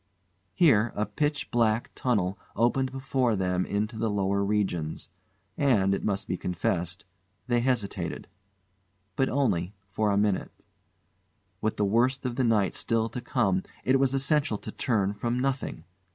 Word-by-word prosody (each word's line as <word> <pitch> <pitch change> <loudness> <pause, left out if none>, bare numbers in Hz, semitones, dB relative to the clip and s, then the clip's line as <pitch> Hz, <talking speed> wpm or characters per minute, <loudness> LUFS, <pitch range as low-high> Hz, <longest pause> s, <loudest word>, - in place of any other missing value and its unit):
Here 120 -9 +4
a 105 - 0
pitch 150 +2 -2
black 115 -1 +1
tunnel 100 -7 0 0.2
opened 125 +3 +2
before 130 -3 0
them 90 -1 0
into 105 +3 -2
the 115 0 +1
lower 100 -1 +1
regions, 95 -6 -1 0.5
and 105 -9 +3
it 100 - -2
must 100 -1 -1
be 90 - -1
confessed 90 +1 -2 0.4
they 120 -1 +2
hesitated. 120 -5 -1 0.9
But 135 - +2
only 105 -9 0
for 105 +2 -1
a 100 - +2
minute. 105 -2 -1 1.0
With 110 0 -1
the 105 - +2
worst 125 +6 +2
of 125 -2 -2
the 130 - +1
night 105 -5 +2
still 115 0 0
to 125 - -5
come 100 -7 +1 0.2
it 130 +1 +3
was 135 0 +2
essential 140 -3 +1
to - - -7
turn 100 -5 0
from 120 +4 -2
nothing. 130 - -2
110 Hz, 150 wpm, -28 LUFS, 100-130 Hz, 1.0 s, Here